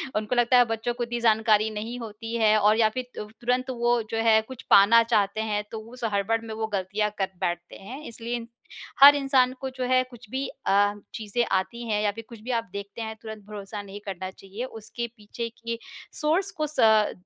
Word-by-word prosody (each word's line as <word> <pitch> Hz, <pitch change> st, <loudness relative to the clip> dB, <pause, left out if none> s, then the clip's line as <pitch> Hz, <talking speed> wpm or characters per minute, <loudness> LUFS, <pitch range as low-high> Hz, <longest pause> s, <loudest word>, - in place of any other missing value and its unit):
उनको 215 Hz, +4 st, -1 dB
लगता 240 Hz, +1 st, +4 dB
है 245 Hz, -, +7 dB
बच्चों 225 Hz, +1 st, -2 dB
को 240 Hz, 0 st, -3 dB
इतनी 240 Hz, 0 st, -3 dB
जानकारी 220 Hz, -1 st, +3 dB
नहीं 220 Hz, +3 st, -5 dB
होती 225 Hz, +1 st, -6 dB
है 215 Hz, -1 st, +4 dB
और 210 Hz, +1 st, +4 dB
या 220 Hz, -1 st, +4 dB
फिर 255 Hz, +3 st, -4 dB
अ, -, -, -3 dB, 0.2 s
तुरंत 250 Hz, +2 st, 0 dB
वो 240 Hz, -1 st, +1 dB
जो 225 Hz, -, -1 dB
है, 220 Hz, -1 st, +5 dB
कुछ 250 Hz, +2 st, -10 dB
पाना 210 Hz, +4 st, +7 dB
चाहते 215 Hz, -2 st, +1 dB
हैं, 210 Hz, -1 st, -1 dB
तो 225 Hz, -, -5 dB
उस 250 Hz, -1 st, -11 dB
हड़बड़ 200 Hz, +3 st, +1 dB
में 220 Hz, -, -6 dB
वो 220 Hz, 0 st, -2 dB
ग़लतियाँ 205 Hz, +1 st, -1 dB
कर 190 Hz, -1 st, -1 dB
बैठते 175 Hz, 0 st, -3 dB
हैं, 250 Hz, +9 st, -9 dB
इसलिए 235 Hz, +1 st, -5 dB, 0.6 s
हर 285 Hz, +1 st, +11 dB
इंसान 270 Hz, -3 st, +3 dB
को 265 Hz, -, -3 dB
जो 260 Hz, 0 st, -5 dB
है 255 Hz, 0 st, +4 dB
कुछ 240 Hz, -2 st, -14 dB
भी 265 Hz, +3 st, -2 dB
अ, 205 Hz, +1 st, +1 dB, 0.2 s
चीज़ें 220 Hz, +1 st, -1 dB
आती 235 Hz, +6 st, -4 dB
हैं 210 Hz, -1 st, +1 dB
या 205 Hz, -, +2 dB
फिर 225 Hz, +2 st, -9 dB
कुछ 230 Hz, -2 st, -11 dB
भी 250 Hz, -, -3 dB
आप 230 Hz, -4 st, -1 dB
देखते 200 Hz, +3 st, -6 dB
हैं 220 Hz, 0 st, -4 dB
तुरंत 220 Hz, -1 st, -8 dB
भरोसा 205 Hz, 0 st, -7 dB
नहीं 200 Hz, 0 st, -9 dB
करना 190 Hz, -1 st, -5 dB
चाहिए। 195 Hz, +5 st, -8 dB
उसके 225 Hz, 0 st, -6 dB
पीछे 225 Hz, +2 st, -6 dB
के 230 Hz, 0 st, -4 dB, 0.4 s
सोर्स 330 Hz, +6 st, +2 dB
को 305 Hz, -, +1 dB
स 305 Hz, -, -6 dB
अ, 220 Hz, -1 st, +5 dB
225 Hz, 215 wpm, -26 LUFS, 210-240 Hz, 0.6 s, हर